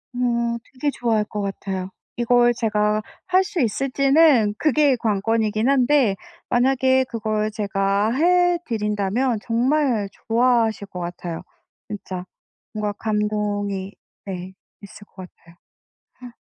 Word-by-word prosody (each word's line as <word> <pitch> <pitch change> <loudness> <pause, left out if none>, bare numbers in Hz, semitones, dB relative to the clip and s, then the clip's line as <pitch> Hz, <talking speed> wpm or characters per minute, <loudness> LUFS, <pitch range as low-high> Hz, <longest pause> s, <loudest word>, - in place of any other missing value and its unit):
어. 235 -1 0 0.2
되게 290 +3 -1
좋아할 225 -5 0
것 210 -1 -5
같아요. 195 -1 -4 0.3
이걸 240 0 +3
제가 210 -2 +1 0.3
할 370 +1 +4
수 375 -4 -2
있을지는 270 -1 +3
그게 295 -1 +3
관건이긴 220 +1 0
한데 270 -5 +3 0.3
만약에 260 +1 +3
그걸 215 -1 -2
제가 200 0 0
해드린다면 255 - +1
정말 240 -2 +1 0.2
좋아하실 230 -3 +2
것 180 -2 -8
같아요. 170 -1 -5 0.5
진짜. 190 -3 -6 0.5
뭔가 210 -1 -2
감동이 210 -2 -2 0.3
네. 185 -1 -6 0.3
있을 205 +1 -13
것 185 -2 -11
같아요. 170 0 -22 0.7
허. 245 -1 -10
220 Hz, 235 characters per minute, -22 LUFS, 205-255 Hz, 0.7 s, 할